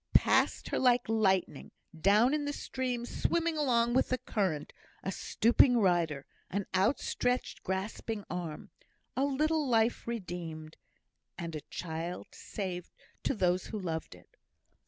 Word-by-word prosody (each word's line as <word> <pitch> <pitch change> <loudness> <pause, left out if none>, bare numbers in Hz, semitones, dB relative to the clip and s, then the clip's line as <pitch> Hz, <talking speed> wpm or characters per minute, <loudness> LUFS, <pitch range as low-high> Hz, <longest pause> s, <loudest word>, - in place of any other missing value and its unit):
Past - - +4
her - - 0
like 245 -1 +4
lightning 200 -4 +1 0.3
down 210 - +4
in 300 -1 0
the 290 - -2
stream, 250 -3 -3
swimming 335 +5 0
along 240 -5 +2
with 260 - +3
the 255 - +1
current 185 -12 -2 0.3
a 190 - -2
stooping 240 +5 +4
rider 170 -8 +2 0.2
an 200 +1 -2
outstretched, 245 +5 +1
grasping 205 +3 -3
arm 170 -4 -5 0.4
a 265 - +1
little 305 +2 +1
life 230 -1 +2
redeemed, 170 -8 -5 0.6
and 170 -3 -5
a 155 - -4
child 170 +1 -5
saved 180 -4 -5 0.3
to - - 0
those 180 -2 +1
who 220 - -4
loved 165 -5 -4
it! - - -21
210 Hz, 135 wpm, -31 LUFS, 175-245 Hz, 0.6 s, Past